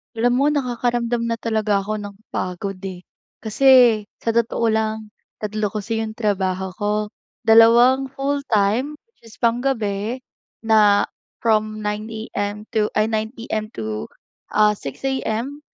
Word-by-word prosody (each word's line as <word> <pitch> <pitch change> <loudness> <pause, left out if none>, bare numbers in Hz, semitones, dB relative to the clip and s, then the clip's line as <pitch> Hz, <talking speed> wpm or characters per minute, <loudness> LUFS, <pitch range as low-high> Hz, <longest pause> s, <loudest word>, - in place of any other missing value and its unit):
Alam 240 +2 +2
mo, 280 - +3
nakakaramdam 240 -4 0
na 230 - 0
talaga 220 -2 0
ako 215 +1 -3
ng 205 -1 -8 0.2
pagod, 185 +1 -4
eh. 180 -1 -8 0.4
Kasi 230 +5 +1 0.5
sa 230 - -2
totoo 230 0 +1
lang, 220 -1 -2 0.3
3 215 0 -1
kasi 215 +2 -3
yung 220 -1 -4
trabaho 190 -4 -1
ko, 205 0 0 0.5
dalawang 235 +4 +6
full-time, 270 -2 0 0.2
which 230 - -21
is 220 - -14
panggabi 235 -1 -1 0.4
na 210 -2 +5 0.4
from 215 -1 +1
9:00 210 +1 -3 0.2
am 205 +1 -3
to 215 -2 +2
ay, 215 +1 +2
9 220 0 0
pm 220 -2 -4
to, 110 -1 -4 0.5
ah, 210 0 +5
6:00 170 - -7
am 265 +1 -2
220 Hz, 135 wpm, -21 LUFS, 210-235 Hz, 0.5 s, dalawang